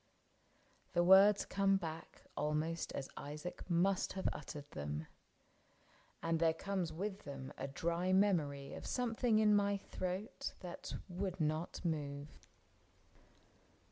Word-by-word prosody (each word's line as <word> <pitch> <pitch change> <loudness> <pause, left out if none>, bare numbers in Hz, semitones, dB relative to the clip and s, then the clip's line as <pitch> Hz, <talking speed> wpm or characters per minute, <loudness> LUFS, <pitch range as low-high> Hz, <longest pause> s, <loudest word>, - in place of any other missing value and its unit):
— - - -35
The 175 - +5
words 195 +3 +7
come 195 0 +3
back 165 -3 -7
Almost 155 +2 -1
as 135 - -3
Isaac 150 +6 -6
must 180 +3 +2
have 190 - -1
uttered 145 -1 -7
them. 75 +2 -4 1.2
And 165 -1 +1
there 165 -1 +3
comes 190 -2 -2
with 195 +5 -3
them 135 -4 -7
a 135 - -4
dry 170 +6 0
memory 160 -8 +2
Of - - -7
something 235 -2 +1
in 215 -1 +5
my 200 0 +3
throat 185 +1 -4
that 180 -1 -6
would 185 0 -3
not 155 +3 -1
move. 145 -3 -3
170 Hz, 125 wpm, -37 LUFS, 150-195 Hz, 1.2 s, words